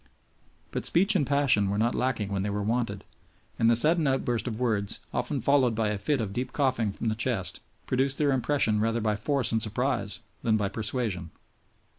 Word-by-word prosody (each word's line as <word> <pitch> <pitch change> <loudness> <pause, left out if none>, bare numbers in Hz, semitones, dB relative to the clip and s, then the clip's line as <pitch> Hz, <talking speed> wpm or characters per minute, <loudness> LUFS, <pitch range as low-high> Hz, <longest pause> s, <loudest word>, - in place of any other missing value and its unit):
But - - -3
speech 195 +5 +4
and 145 -8 +1
passion 140 -8 +2
were 100 - -1
not 115 +3 +1
lacking 115 -6 -1
when 100 -1 -2
they 100 - -2
were 100 0 -2
wanted, 110 -2 -2 0.6
and 115 - +4
the 115 - +4
sudden 155 +5 +5
outburst 125 -3 0
of 110 -2 -4
words, 110 -5 0
often 135 +3 -1
followed 130 -2 +3
by 110 -1 0
a 105 -1 -2
fit 145 +5 0
of 105 -4 -3
deep 125 +4 -4
coughing 130 -7 +1
from 115 - -5
the - - 0
chest, 115 -4 -2 0.3
produced 135 +2 0
their 145 -2 +2
impression 130 -4 +1
rather 115 +2 0
by 105 -1 0
force 135 +5 -1
and 110 -1 +1
surprise 110 -1 -1 0.2
than 110 -1 +2
by 100 -2 -1
persuasion. 105 -4 -3
115 Hz, 195 wpm, -27 LUFS, 105-135 Hz, 0.6 s, sudden